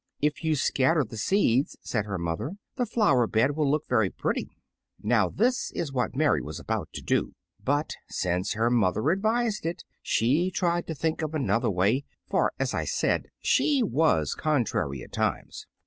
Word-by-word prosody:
"If 150 +3 -1
you 160 -1 +2
scatter 145 +2 +2
the 110 - -9
seeds," 135 - +1
said 110 -3 -1
her 100 -2 -3
mother, 85 - -3 0.2
"the 245 -2 -1
flower 145 - +3
bed 115 +6 +2
will 150 -3 +1
look 150 +1 0
very 110 -6 +2
pretty." - - -2 0.5
Now 105 -4 +3
this 245 - 0
was 145 -5 -3
what 125 0 -1
Mary 150 +2 +2
was 75 +1 -7
about - - -3
to - - -6
do; - - 0 0.3
but 145 +3 0 0.2
since 90 +1 -1
her 115 +3 +1
mother 110 - +2
advised 220 +3 0
it, 165 +2 -3 0.2
she 145 +11 +2
tried 175 -2 0
to 160 - -4
think 160 +3 -1
of 155 0 -3
another 115 -7 +1
way, 100 +8 +2 0.2
for, - - +2
as - - -1
I - - -1
said, - - 0 0.2
she 285 -5 +3
was 160 -6 +2
contrary 110 - -1
at - - -13
times. - - -2
140 Hz, 175 wpm, -27 LUFS, 110-165 Hz, 0.5 s, flower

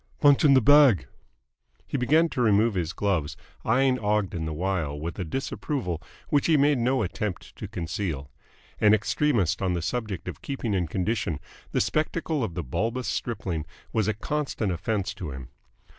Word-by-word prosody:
"Punchin' 145 -1 +6
the 130 - +6
bag." 135 - +6 0.8
He - - -5
began 155 +6 +4
to 125 - -2
remove 110 0 +4
his 85 -3 -1
gloves, 85 -7 -1 0.3
eyeing 130 +2 +3
Ogden 105 -6 0
the 80 - -3
while 80 -3 -2
with 85 +6 -5
a - - 0
disapproval 115 - -3 0.3
which 145 -3 +2
he 160 -2 +5
made 145 -1 +3
no 125 0 +2
attempt 95 0 -4
to - - -6
conceal. 80 -5 -4 0.5
An 105 0 +6
extremist 105 - +1
on 95 -2 +1
the 85 - -1
subject 110 -5 -3
of - - -6
keeping 130 -6 -3
in 90 -3 0
condition, 95 -3 -1 0.3
the - - +1
spectacle 155 -2 0
of 95 -7 -3
the 90 - -2
bulbous 115 - -2
stripling 95 -9 -2 0.3
was 110 -3 +1
a 110 - +1
constant 125 -3 -2
offence 100 +3 -2
to 85 - -6
him. 65 -2 -8
105 Hz, 165 wpm, -26 LUFS, 85-130 Hz, 0.8 s, Punchin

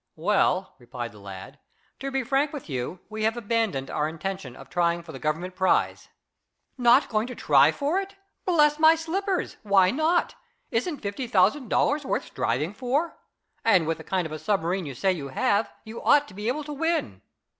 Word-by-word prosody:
"Well," 185 +1 +1
replied 120 -1 -6
the 105 - -15
lad, 95 -1 -10 0.4
"to 275 - -3
be 270 -1 -1
frank 275 +4 +1
with 290 - -7
you, 135 +5 -4
we 215 +1 -6
have 225 +2 +1
abandoned 220 - -1
our 150 0 0
intention 165 -4 -5
of - - -12
trying 170 -1 0
for 165 - -10
the 135 - -8
Government 165 +5 -2
prize." 190 0 +1 0.7
"Not 250 +2 +5
going 220 0 0
to 250 - -7
try - - +5
for 300 +6 0
it? 390 0 -7 0.3
Bless 300 -4 +3
my 320 +1 +7
slippers! 370 +4 -2
Why 195 -3 +4
not? 315 +6 +1 0.4
Isn't 275 +6 -1
fifty 205 +5 -4
thousand 230 +4 +2
dollars 290 +1 +2
worth 270 - -2
striving 145 - -2
for? 270 +8 -1 0.5
And, 190 -7 +4
with 160 0 -2
the - - -9
kind 185 -1 -1
of 160 - -6
a 155 - -5
submarine 185 -3 -1
you 135 - -6
say 190 +10 +2
you 155 -7 -4
have, 200 +10 +1
you 220 +1 -8
ought 290 0 +4
to - - -14
be 210 +3 -5
able 285 +5 -1
to 295 +1 -6
win." 290 - -1
210 Hz, 190 wpm, -26 LUFS, -, 0.7 s, my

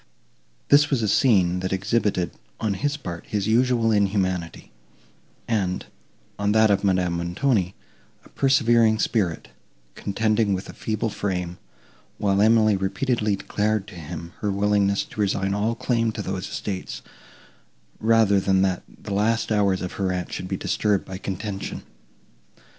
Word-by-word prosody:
This 145 +1 +6
was 130 -6 +1
a - - +1
scene, 95 -5 +3
that 95 0 -3
exhibited, 100 -2 0 0.3
on 110 -3 0
his 145 +8 -1
part, 90 - -7
his 105 -2 -1
usual 120 0 +3
inhumanity, 95 -4 0 0.8
and, 95 -5 -1 0.5
on 100 0 +1
that 110 -1 +5
of 100 - +1
Madame 90 -3 +2
Montoni, 90 +2 0 0.5
a - - -17
persevering 120 -5 +3
spirit, 100 -6 -1 0.4
contending 110 0 0
with 95 - -6
a - - -8
feeble 110 0 -2
frame; 90 -4 -3 0.6
while 100 -1 +1
Emily 110 -1 +5
repeatedly 105 +3 0
declared 105 +1 -1
to - - -13
him 85 0 -8
her 105 - -1
willingness 100 0 +2
to 105 - -6
resign 95 -1 0
all 105 +3 0
claim 115 -2 0
to 105 - -4
those 95 0 -4
estates, 95 -3 -5 1.0
rather 110 -3 +4
than 95 0 +2
that 95 -2 0 0.2
the 100 - -4
last 110 +3 +1
hours 100 -3 +2
of 90 - -4
her 95 -1 +1
aunt 90 -1 -4
should 90 - -4
be - - -2
disturbed 105 -2 0
by 95 0 -7
contention. 100 0 -5
100 Hz, 145 wpm, -24 LUFS, 95-110 Hz, 1.0 s, This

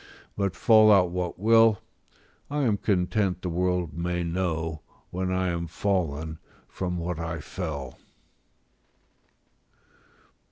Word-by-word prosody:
But 100 -2 -1
fall 110 -1 +6
out 90 -4 +5
what 90 -1 -3
will, 115 +1 +5 0.7
I 145 0 -1
am 110 -5 +2
content 95 -1 0
the 90 - -2
world 90 -2 0
may 85 +1 -2
know, 80 -3 -2 0.3
when 95 +1 -2
I 95 0 0
am 85 0 -2
fallen, 80 -4 -2 0.3
from 90 -1 -4
what 85 -1 -3
I 85 0 -4
fell. 75 -5 -6
90 Hz, 115 wpm, -26 LUFS, 85-100 Hz, 0.7 s, fall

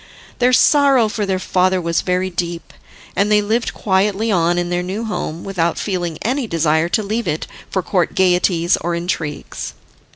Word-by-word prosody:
Their 250 0 +4
sorrow 275 -2 +5
for 210 -1 -2
their 190 -1 +1
father 185 0 +1
was 170 -1 0
very 185 +1 -1
deep, 170 -1 -4 0.4
and 205 +1 +1
they 210 - +5
lived 225 +3 0
quietly 205 +3 +1
on 175 -2 +2
in 175 0 -1
their 175 0 0
new 190 +5 -4
home, 170 -6 -4
without 170 -4 -1
feeling 175 -5 -2
any 255 +2 -1
desire 160 -1 +1
to 215 - +1
leave 220 +4 -2
it 155 - -2 0.2
for 190 - -1
court 180 -1 0
gaieties 180 -1 +3
or 170 0 -2
intrigues. 170 -3 -4
185 Hz, 170 wpm, -19 LUFS, 170-210 Hz, 0.4 s, sorrow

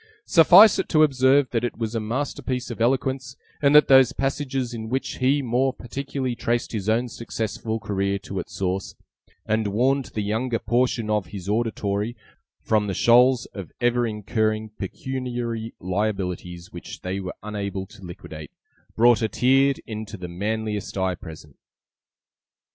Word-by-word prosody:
Suffice 185 +6 +7
it - - -2
to 155 -1 +5
observe, 135 -1 +3
that 115 -1 0
it 120 - -3
was 115 -1 -3
a 115 - 0
masterpiece 125 +2 -3
of 115 - -6
eloquence; 130 +1 0 0.2
and 145 0 +4
that 150 -1 +8
those 135 -1 +6
passages 135 -2 -2
in 110 -1 -6
which 130 +2 -3
he 135 +2 +2
more 130 +2 +1
particularly 130 +1 -4
traced 120 0 -1
his 110 -2 -3
own 120 +3 +2
successful 115 -1 -4
career 100 -2 -1
to 100 -1 -6
its - - -7
source, 95 0 -2 0.5
and 110 0 0
warned 130 +6 +1
the 105 - -4
younger 115 +4 -1
portion 120 -1 0
of 105 -4 0
his 95 0 -8
auditory 105 0 -1 0.5
from 105 -2 +1
the 95 - -2
shoals 125 +1 +5
of 100 -4 -8
ever 120 0 +2
incurring 110 0 -1
pecuniary 120 +1 -5
liabilities 90 -2 -3
which 85 - -9
they 95 +1 -3
were 95 -2 -6
unable 100 -2 -4
to 95 - -16
liquidate, 80 -3 -9 0.5
brought 120 +1 +5
a 110 - +2
tear 135 +5 +3
into 110 -1 -6
the 90 -1 -6
manliest 105 +3 -3
eye 95 -1 +1
present. 80 -4 -11
115 Hz, 155 wpm, -24 LUFS, 100-130 Hz, 0.5 s, that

